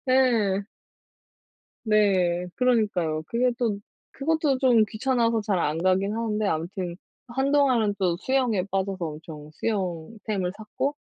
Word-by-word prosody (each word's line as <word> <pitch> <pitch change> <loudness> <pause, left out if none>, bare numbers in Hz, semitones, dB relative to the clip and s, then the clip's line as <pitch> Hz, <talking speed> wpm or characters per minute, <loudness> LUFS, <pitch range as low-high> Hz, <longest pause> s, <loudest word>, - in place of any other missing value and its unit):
네. 230 -7 +3 1.2
네. 185 -5 +2
그러니까요. 205 -11 +1
그게 250 +2 +2
또 220 -5 0 0.3
그것도 295 -1 +1
좀 245 -5 +5
귀찮아서 230 0 +1
잘 205 -3 0
안 155 -1 0
가긴 190 +3 +2
하는데 215 -2 -1
아무튼 175 +1 -3 0.3
한동안은 265 -4 +2
또 180 -3 +1
수영에 240 -4 +1
빠져서 195 -1 -1
엄청 155 -1 -8
수영 185 -2 -3
템을 190 -4 -1
샀고 245 +7 -3
210 Hz, 255 characters per minute, -25 LUFS, 180-245 Hz, 1.2 s, 좀